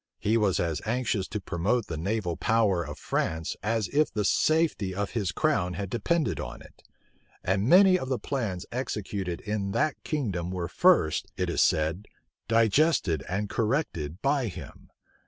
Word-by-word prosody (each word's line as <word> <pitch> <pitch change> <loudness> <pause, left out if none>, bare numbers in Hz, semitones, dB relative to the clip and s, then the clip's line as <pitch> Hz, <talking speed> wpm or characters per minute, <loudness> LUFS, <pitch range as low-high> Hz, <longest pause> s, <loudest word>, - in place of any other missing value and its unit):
He 110 +2 +1
was 105 -5 +2
as 85 -3 -1
anxious 115 -4 -1
to 105 - -4
promote 100 +5 -1
the 85 - -5
naval 90 +1 -2
power 105 -5 +2
of 75 -2 -7
France 80 0 -2
as 110 0 0
if 150 +2 +2
the 105 -1 -1
safety 155 - +1
of 100 0 -2
his 100 -7 -1
crown 90 - 0
had 100 +1 -5
depended 165 +6 0
on - - -7
it; - - -18 0.6
and 95 +5 +1
many 185 +1 +7
of 130 - -5
the 130 - +1
plans 110 -12 -3
executed 100 -7 -3
in 100 -2 -3
that 155 +5 0
kingdom 100 - -2
were 90 -2 -3
first, 165 - +3
it - - -1
is - - +1
said,[*] 80 +6 +1 0.4
digested 115 - +3
and 100 +3 -1
corrected 105 - -2
by 140 -3 +2
him. 90 - -10
105 Hz, 160 wpm, -27 LUFS, 90-130 Hz, 0.6 s, many